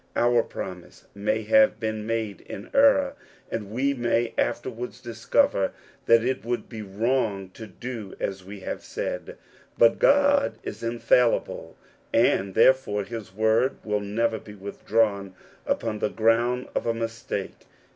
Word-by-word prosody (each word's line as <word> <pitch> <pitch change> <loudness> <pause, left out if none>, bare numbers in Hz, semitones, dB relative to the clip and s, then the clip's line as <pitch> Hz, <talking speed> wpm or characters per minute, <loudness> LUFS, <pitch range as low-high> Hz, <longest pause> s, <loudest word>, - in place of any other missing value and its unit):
Our 120 0 +4
promise 90 -5 -8
may 105 +2 -1
have 275 0 +4
been 110 -1 -3
made 110 -3 -2
in 100 - -8
error, 280 0 +5 0.4
2if^ 105 -3 -3
we 135 +6 0
may 120 -2 0
afterwards 120 0 -2
discover 115 - +1 0.3
that 115 0 +6
it 130 +2 -1
would 120 +1 -3
be 110 -3 -7
wr6<^^ 105 -2 -1
to 110 - -9
do 110 0 -7
as 95 -1 -3
we 100 +1 -10
have - - -5
said; - - -5 0.4
but 115 -1 +5
God 285 0 +4
is - - -6
infallible, 120 +1 +1 0.4
ar^^ 95 0 +3
therefore 130 -6 +4
his 110 -2 -7
word 110 +5 +2
will 105 -1 0
never 110 +2 0
be 105 0 -12
withdrawn 100 -1 -1 0.3
upc^^ 110 -2 -1
the - - 0
ground 120 +3 +1
of - - -2
a 115 - +1
mistake. 115 0 -5
115 Hz, 140 wpm, -25 LUFS, 105-120 Hz, 0.4 s, that